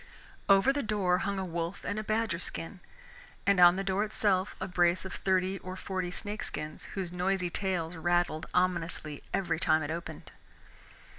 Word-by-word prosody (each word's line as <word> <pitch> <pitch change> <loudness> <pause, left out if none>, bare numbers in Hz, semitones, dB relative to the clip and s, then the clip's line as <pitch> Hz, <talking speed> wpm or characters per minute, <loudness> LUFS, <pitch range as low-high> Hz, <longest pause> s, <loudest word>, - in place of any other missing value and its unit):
Over 195 +7 +6
the 285 - 0
door 200 -6 +1
hung 200 0 -1
a 190 - -2
wolf 170 +1 -4
and 205 +1 -2
a - - -3
badger 215 -5 0
skin, 180 +1 -4 0.7
and 200 -2 +4
on 175 0 +8
the 195 - -2
door 195 +1 +1
itself 205 -2 0
a - - -3
brace 175 -1 +2
of 190 - -6
thirty 190 0 +1
or 185 0 -7
forty 185 -1 -3
snake 205 +4 -5
skins 150 0 -5
whose 185 -3 -3
noisy 180 0 0
tails 180 -4 -2
rattled 175 -1 0
ominously 170 -4 0
every 185 -4 0
time 155 -1 +3
it 145 - -3
opened. 160 -2 -6
185 Hz, 170 wpm, -30 LUFS, 170-195 Hz, 0.7 s, on